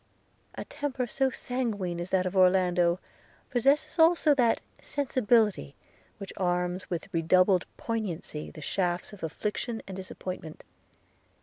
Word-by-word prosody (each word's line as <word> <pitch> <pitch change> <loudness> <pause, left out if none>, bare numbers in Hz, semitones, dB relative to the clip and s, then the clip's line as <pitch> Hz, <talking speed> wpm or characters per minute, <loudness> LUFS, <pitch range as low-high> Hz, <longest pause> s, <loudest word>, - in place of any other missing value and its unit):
A - - -6
temper 275 -4 -3
so 265 +3 +1
sanguine 215 -10 -3
as 175 - -5
that 185 -1 +2
of 185 +1 -3
Orlando, 180 -2 +4 0.5
possesses 280 +6 +2
also 325 -2 +5
that 245 -4 +3 0.2
sensibility 230 - +1 0.4
which 195 - -8
arms 180 0 -1
with 180 +3 -4
redoubled 180 +3 +4
poignancy 195 -9 -4
the 155 - -10
shafts 180 +2 -1
of 205 - -12
affliction 210 +7 -3
and 190 - -6
disappointment. 185 -3 -7
190 Hz, 120 wpm, -28 LUFS, 180-245 Hz, 0.5 s, also